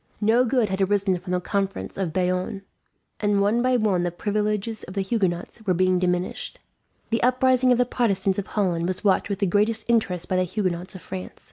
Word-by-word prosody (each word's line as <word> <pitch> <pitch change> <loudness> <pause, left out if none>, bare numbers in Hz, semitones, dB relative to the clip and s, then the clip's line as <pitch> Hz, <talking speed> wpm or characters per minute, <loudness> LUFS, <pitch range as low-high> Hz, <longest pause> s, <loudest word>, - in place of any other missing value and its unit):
No 225 +4 +3
good 245 -3 +1
had 190 +1 -2
arisen 195 -1 +1
from 180 +1 -7
the 180 - +1
Conference 195 +1 -3
of 190 -4 -2
Bayonne, 185 +3 -1 0.6
and 205 -1 +2
one 210 +4 +2
by 255 0 +3
one 205 -6 +1
the 175 - 0
privileges 210 +4 -2
of 185 - -10
the 195 - 0
Huguenots 190 0 -2
were 185 - +3
being 185 0 +2
diminished. 180 0 -2 0.5
The 230 - +1
uprising 255 +1 +3
of 245 - +4
the 250 - +3
Protestants 200 -6 0
of 200 - -5
Holland 175 -5 0
was 185 +2 -3
watched 200 0 +2
with 200 - -1
the 200 - +1
greatest 210 +4 +1
interest 195 -7 +1
by 185 - 0
the 185 - +3
Huguenots 185 0 -3
of 185 - -10
France. 185 -1 -7
195 Hz, 205 wpm, -24 LUFS, 185-220 Hz, 0.6 s, of